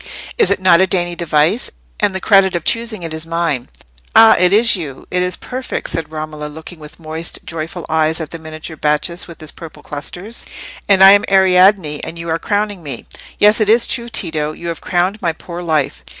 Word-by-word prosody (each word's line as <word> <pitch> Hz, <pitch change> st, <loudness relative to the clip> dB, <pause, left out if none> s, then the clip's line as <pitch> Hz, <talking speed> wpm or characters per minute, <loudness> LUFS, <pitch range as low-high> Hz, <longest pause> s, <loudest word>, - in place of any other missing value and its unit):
Is 450 Hz, -, +4 dB
it -, -, +2 dB
not 185 Hz, -2 st, +5 dB
a 190 Hz, -, +3 dB
dainty 175 Hz, -2 st, 0 dB
device? 165 Hz, +6 st, +1 dB, 0.3 s
and 205 Hz, -2 st, +1 dB
the -, -, -2 dB
credit 195 Hz, -2 st, +3 dB
of 170 Hz, -, -2 dB
choosing 230 Hz, -3 st, -1 dB
it 165 Hz, -1 st, -5 dB
is 160 Hz, +1 st, -6 dB
mine." 165 Hz, -7 st, -2 dB, 0.5 s
"Ah! 225 Hz, 0 st, +8 dB
it 180 Hz, 0 st, +4 dB
is 225 Hz, +3 st, +6 dB
you—it 170 Hz, +2 st, -4 dB
is 180 Hz, 0 st, 0 dB
perfect!" 255 Hz, +1 st, -5 dB
said 160 Hz, -2 st, -3 dB
Romola, 155 Hz, -1 st, -6 dB
looking 160 Hz, +3 st, -10 dB
with 150 Hz, +1 st, -12 dB
moist 160 Hz, +1 st, -5 dB
joyful 165 Hz, +1 st, -6 dB
eyes 160 Hz, 0 st, +1 dB
at 160 Hz, -2 st, -6 dB
the 165 Hz, -, -7 dB
miniature 155 Hz, 0 st, -8 dB
Bacchus, 150 Hz, +4 st, -1 dB
with 170 Hz, -, -12 dB
his 155 Hz, -2 st, -9 dB
purple 155 Hz, -3 st, -12 dB
clusters. 180 Hz, +9 st, -6 dB, 0.4 s
"And 190 Hz, -1 st, +6 dB
I 195 Hz, -, +10 dB
am 200 Hz, 0 st, +5 dB
Ariadne, 185 Hz, -4 st, +4 dB
and 170 Hz, -, -6 dB
you 165 Hz, 0 st, -6 dB
are 165 Hz, +1 st, -1 dB
crowning 205 Hz, 0 st, -2 dB
me! 140 Hz, -7 st, -5 dB, 0.3 s
Yes, 210 Hz, +2 st, +5 dB
it 210 Hz, -, +2 dB
is 230 Hz, +2 st, +4 dB
true, 240 Hz, -2 st, -2 dB
Tito; 155 Hz, -8 st, -2 dB
you 170 Hz, +2 st, -7 dB
have 165 Hz, -, -6 dB
crowned 185 Hz, +3 st, -1 dB
my 170 Hz, -3 st, 0 dB
poor 170 Hz, +2 st, -8 dB
life." 155 Hz, -, -1 dB
170 Hz, 205 wpm, -16 LUFS, 155-195 Hz, 0.5 s, I